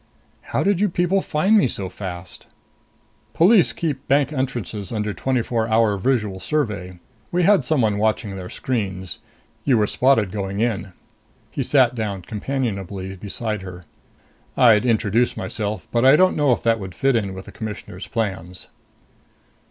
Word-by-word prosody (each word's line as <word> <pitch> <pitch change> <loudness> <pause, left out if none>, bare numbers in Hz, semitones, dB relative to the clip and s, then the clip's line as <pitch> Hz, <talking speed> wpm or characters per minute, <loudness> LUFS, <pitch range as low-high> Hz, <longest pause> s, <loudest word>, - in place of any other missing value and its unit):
"How 145 - -2
did 200 0 +1
you 210 - +3
people 175 +3 +1
find 185 +8 +2
me 205 - +5
so 100 -5 -3
fast?" 90 -1 -8 0.9
"Police 185 - +5
keep 145 -5 -4
bank 145 +2 +2
entrances 120 -7 -3
under 105 -2 -2
twenty 125 +5 0
four 115 -2 -1
hour 110 -2 +3
visual 105 -2 0
survey. 105 - -2 0.3
We 180 +1 +1
had 195 -4 +5
someone 115 -7 +1
watching 110 -1 0
their 90 -1 -7
screens. 95 -7 -3 0.4
You 130 -4 +3
were 105 - +3
spotted 115 -4 +2
going 100 -1 -3
in." 105 -5 -1 0.6
He - - -3
sat - - +3
down 105 -5 -4
companionably 100 -5 -4
beside 105 +2 -4
her. 90 -2 -9 0.7
"I'd 120 -2 +5
introduce 115 +1 +1
myself, 100 +1 -4
but 120 0 +1
I 135 +2 +7
don't 185 +3 +4
know 145 -3 +3
if 120 - 0
that 115 -1 +2
would 95 -3 -8
fit 135 -1 +2
in 100 -4 -1
with 95 - -8
the - - -11
Commissioner's 105 -4 -7
plans." 95 -5 -4
110 Hz, 155 wpm, -22 LUFS, 95-135 Hz, 0.9 s, I